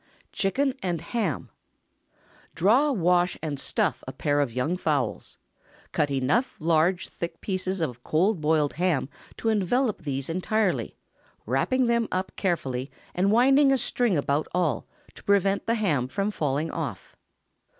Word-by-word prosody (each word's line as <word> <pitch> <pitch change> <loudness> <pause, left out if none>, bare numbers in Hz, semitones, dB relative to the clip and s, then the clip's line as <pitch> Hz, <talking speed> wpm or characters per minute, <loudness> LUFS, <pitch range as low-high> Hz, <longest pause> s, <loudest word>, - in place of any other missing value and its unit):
CHICKEN 260 +7 0
AND 175 -3 -1
HAM. 220 +8 -3 1.0
✠ - - -37
Draw, 245 - +4
wash, 180 -3 +2
and 145 -3 -3
stuff - - -1
a - - -3
pair 145 0 0
of 140 -4 +1
young 130 +9 -1
fowls. 145 -9 -2 0.5
Cut 145 - +1
enough 140 - +1
large, 170 +3 +2
thick 170 - -5
slices 190 -1 -2
of 125 -6 -3
cold 180 +3 +1
boiled 150 -1 +2
ham 165 -5 0 0.3
to 225 - -1
envelop 220 +3 +1
these 140 -3 -3
entirely, 185 +3 0 0.5
wrapping 255 -1 +1
them 235 -1 +2
up 185 +1 -2
carefully, 135 -8 -1 0.2
and 190 +3 +2
winding 270 +5 +5
a 270 - +4
string 240 -5 +1
about 145 +1 0
all, 175 -4 0 0.3
to - - -15
prevent 200 0 +2
the 230 - +2
ham 155 - +1
from 200 +9 -1
falling 150 -3 -1
off. 140 - -5
180 Hz, 145 wpm, -26 LUFS, 150-215 Hz, 1.0 s, winding